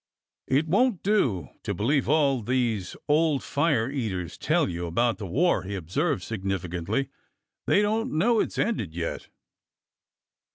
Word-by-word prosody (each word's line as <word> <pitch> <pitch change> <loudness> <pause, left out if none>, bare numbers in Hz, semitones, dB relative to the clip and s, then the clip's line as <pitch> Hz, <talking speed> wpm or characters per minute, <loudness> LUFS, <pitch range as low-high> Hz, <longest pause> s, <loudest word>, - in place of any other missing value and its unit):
It 145 +5 +2
won't 205 +4 +2
do 140 - +1
to - - -3
believe 130 +4 +1
all 140 -4 +3
these 115 -5 -1
old 150 -1 +2
fire 145 -6 +1
eaters 100 - -3
tell - - +1
you 85 0 -4
about 115 +8 +1
the 100 - -5
war," 170 - +2
he 100 +2 -5
observed 130 - -1
significantly. 95 +4 -2 0.3
'' - - -54
They 205 - +4
don't 225 +4 0
know 225 +7 +3
it - - 0
's - - -10
ended 110 - -1
yet." 85 -1 -4
130 Hz, 150 wpm, -26 LUFS, 95-160 Hz, 0.3 s, They